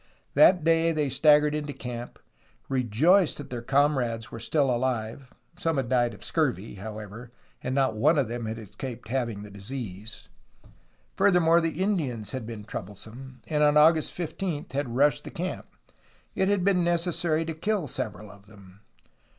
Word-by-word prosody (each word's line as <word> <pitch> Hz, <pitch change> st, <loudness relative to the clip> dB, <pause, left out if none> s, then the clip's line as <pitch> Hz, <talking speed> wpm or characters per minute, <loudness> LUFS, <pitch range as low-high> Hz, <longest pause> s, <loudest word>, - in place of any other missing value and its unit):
That 160 Hz, +4 st, +6 dB
day 165 Hz, +1 st, +3 dB
they 150 Hz, -3 st, 0 dB
staggered 150 Hz, +2 st, +4 dB
into 150 Hz, -1 st, -3 dB
camp, 120 Hz, -2 st, -7 dB, 0.5 s
rejoiced 135 Hz, -, +3 dB
that 145 Hz, -, -9 dB
their 120 Hz, -2 st, -4 dB
comrades 130 Hz, -4 st, +1 dB
were 115 Hz, -, -7 dB
still 135 Hz, +2 st, +1 dB
alive. 120 Hz, +1 st, -2 dB, 0.3 s
Some 165 Hz, -2 st, 0 dB
had 130 Hz, -3 st, -1 dB
died 120 Hz, -3 st, +2 dB
of -, -, -17 dB
the -, -, -5 dB
scurvy, 130 Hz, -, -1 dB
however, 105 Hz, +3 st, -8 dB, 0.3 s
and 130 Hz, +1 st, -3 dB
not 135 Hz, -5 st, +2 dB
one 150 Hz, +9 st, +3 dB
of 135 Hz, -5 st, +2 dB
them 120 Hz, 0 st, -4 dB
had 110 Hz, +1 st, -4 dB
escaped 115 Hz, +2 st, -8 dB
having 120 Hz, -5 st, -2 dB
the 105 Hz, -, -11 dB
disease. 105 Hz, 0 st, -7 dB, 0.9 s
Furthermore, 175 Hz, -4 st, +4 dB
the 165 Hz, +2 st, -1 dB
Indians 130 Hz, -, -1 dB
had 130 Hz, -4 st, -5 dB
been 110 Hz, -3 st, -7 dB
troublesome, 110 Hz, +6 st, -9 dB
and 150 Hz, -2 st, 0 dB
on 150 Hz, 0 st, +5 dB
August 155 Hz, +1 st, +5 dB
15 170 Hz, -2 st, -3 dB
had 135 Hz, -4 st, -3 dB
rushed 145 Hz, +2 st, +3 dB
the -, -, -7 dB
camp. 180 Hz, +2 st, -5 dB, 0.7 s
It 190 Hz, -, +1 dB
had 200 Hz, -2 st, +2 dB
been 185 Hz, -2 st, +3 dB
necessary 170 Hz, -2 st, 0 dB
to 165 Hz, -, -3 dB
kill 185 Hz, +1 st, -1 dB
several 105 Hz, -4 st, -5 dB
of 100 Hz, 0 st, -18 dB
them. 100 Hz, -2 st, -16 dB
135 Hz, 165 wpm, -27 LUFS, 115-160 Hz, 0.9 s, That